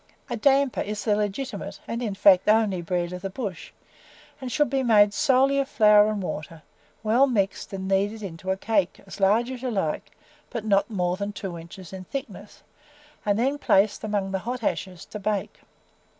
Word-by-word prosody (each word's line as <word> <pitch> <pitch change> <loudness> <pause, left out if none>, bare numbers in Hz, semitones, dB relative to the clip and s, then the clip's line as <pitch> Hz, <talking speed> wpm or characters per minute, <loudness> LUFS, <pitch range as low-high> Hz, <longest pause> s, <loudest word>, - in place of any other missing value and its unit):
A - - 0
damper 275 +2 +2
is 210 0 -4
the 210 -2 +3
legitimate, 210 +2 -3
and, 230 +1 -3
in 215 -5 -2
fact, 195 -1 +5
only 210 -4 +3
bread 175 +1 -2
of 180 - -6
the 195 - -3
bush, 195 -3 -6 0.7
and 255 -1 -5
should 295 +1 +2
be 270 -1 +1
made 210 -4 +5
solely 270 +4 +3
of 275 0 -1
flour 210 -3 +6
and 210 -2 -2
water, 155 -2 -6 0.4
well 235 +6 +4
mixed 200 -6 -1
and 190 -1 -5
kneaded 200 +3 0
into 185 0 -7
a 190 - +1
cake, 200 -3 0
as 195 - -10
large 215 +6 +3
as 255 -2 -7
you 260 - -2
like, 200 -1 -2 0.4
but 230 -4 -5
not 200 0 +2
more 180 -4 -1
than 200 +1 -3
two 195 -3 -6
inches 170 +2 -11
in 185 -1 -7
thickness, 210 -4 -8 0.6
and 205 0 +3
then 270 +5 0
placed 200 -3 +2
among 205 -3 -1
the 190 - -1
hot 245 +4 -5
ashes 185 -4 -3
to 210 - -8
bake. 205 0 -2
205 Hz, 190 wpm, -25 LUFS, 190-235 Hz, 0.7 s, flour